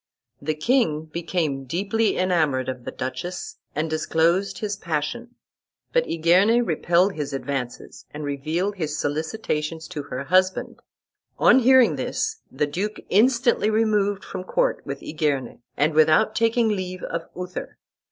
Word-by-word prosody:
The 155 +2 -1
king 160 - +1
became 160 -4 -2
deeply 200 - 0
enamoured 155 -8 +1
of 125 -2 -6
the - - -4
duchess, 130 +8 -5 0.2
and 155 +2 0
disclosed 165 +5 +1
his 210 -1 -2
passion; 200 +8 -4 0.6
but - - +2
Igerne 185 +9 +3
repelled 175 +2 +2
his 150 -4 -4
advances, 135 -3 -5
and 150 +1 -7
revealed 155 +8 -2
his 155 -3 -2
solicitations 155 +1 -2
to 160 -5 -4
her 135 -1 -5
husband. 185 +5 +1 0.6
On - - +6
hearing 260 0 +5
this, 435 0 -2
the - - 0
duke 195 +9 -3
instantly 235 +1 +3
removed 210 -2 +1
from 185 - -6
court - - 0
with - - -5
Igerne, 145 -5 -2 0.2
and 150 +2 +2
without 155 +7 +4
taking 230 0 +2
leave 185 -3 -3
of 165 0 -4
Uther. 180 +1 -6
170 Hz, 135 wpm, -24 LUFS, 150-210 Hz, 0.6 s, On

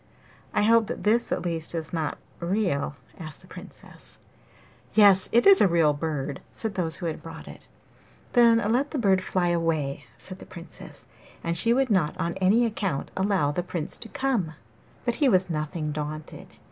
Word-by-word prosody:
'I - - +3
hope 225 0 +4
that - - -5
this, 225 +3 +2
at - - -1
least, 165 -1 -1
is 160 0 -4
not 160 -3 -2 0.2
real?' 170 -6 -1 0.2
asked 155 -3 -8
the - - -17
Princess. - - -13 0.8
'Yes, 200 -3 +6
it 235 - +4
is 395 -1 +8
a - - +6
real 165 -4 +3
bird,' 145 -2 -3
said 220 -2 -4
those 170 -4 -2
who 180 - -6
had 160 -2 -3
brought - - -10
it. - - -12 0.7
'Then 235 -2 +6
let 270 +5 +1
the 300 - -4
bird 195 -6 +2
fly 180 -2 0
away,' 165 -5 -1
said 185 0 -9
the - - -12
Princess; 170 -2 -10 0.4
and 170 0 -1
she 230 +7 +2
would 260 0 +2
not 175 -7 +1
on 170 +1 -1
any 205 +6 +3
account 195 -10 -2
allow 190 -7 +1
the 165 - -1
Prince 175 -3 -3
to 225 - -9
come. 225 -14 -1 0.5
'But 240 -1 0
he 280 - +5
was 185 -4 +2
nothing 155 0 -3
daunted. 150 +1 -6
180 Hz, 180 wpm, -26 LUFS, 160-220 Hz, 0.8 s, is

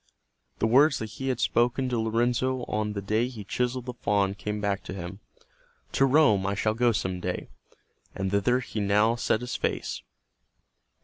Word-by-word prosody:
The - - +1
words 140 +6 +5
that 110 -2 -5
he 135 +4 -5
had 130 -3 0
spoken 120 +3 +1
to 120 -2 0
Lorenzo 120 +3 0
on 105 -2 -2
the 100 -1 -4
day 110 +4 +1
he 120 -5 -8
chiseled 125 +4 -2
the 125 - -5
faun 100 -4 +1
came 105 +1 -4
back 100 -1 -1
to - - -6
him, 95 +1 -7 0.7
"To 135 - +3
Rome 130 -9 +4
I 100 - 0
shall 110 +1 +1
go 120 +1 +3
some 95 -4 -2
day," - - -4 0.7
and 95 -1 -2
thither 110 +6 +2
he 115 - -5
now 105 +3 +3
set 115 -1 0
his 125 +1 -4
face. - - -2
110 Hz, 180 wpm, -27 LUFS, 100-125 Hz, 0.7 s, words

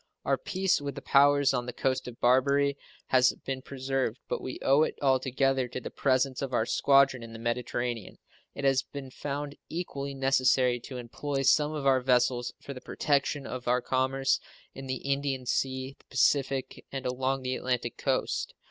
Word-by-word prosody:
Our - - +1
peace 190 -4 0
with 140 -2 -4
the - - -6
powers 140 0 +4
on 125 -1 -1
the 125 - -4
coast 130 -1 -1
of 120 -1 -9
Barbary 140 +3 +3 0.3
has 125 -1 +5
been 135 -1 -3
preserved, 130 -3 -2
but - - -2
we 130 - -5
owe 135 +3 +5
it 155 - +1
altogether 135 -1 +1
to 125 - -5
the - - -7
presence 130 -1 +1
of 135 -2 -4
our 110 -2 +2
squadron 135 0 +4
in 115 -1 -9
the - - -7
Mediterranean. 120 -1 -3 0.4
It 140 - -6
has 135 -1 +3
been 135 -2 -9
found 145 +1 -5
equally 140 -5 -4
necessary 130 -2 +3
to 125 +2 -8
employ 135 +3 -3
some 150 +3 +3
of 150 -3 -4
our 135 -1 +4
vessels 125 -1 +2
for 140 - -8
the 125 - -10
protection 145 -1 0
of 125 -1 -6
our 125 +1 +3
commerce 130 +2 +1 0.3
in 135 0 -8
the 130 -1 -4
Indian 140 -2 -1
Sea, 130 +1 -1
the - - -25
Pacific, 135 0 +1
and 135 -1 -5
along 130 +1 -1
the 130 0 -1
Atlantic 120 -2 -2
coast. 135 -2 -1
130 Hz, 180 wpm, -29 LUFS, 125-140 Hz, 0.4 s, has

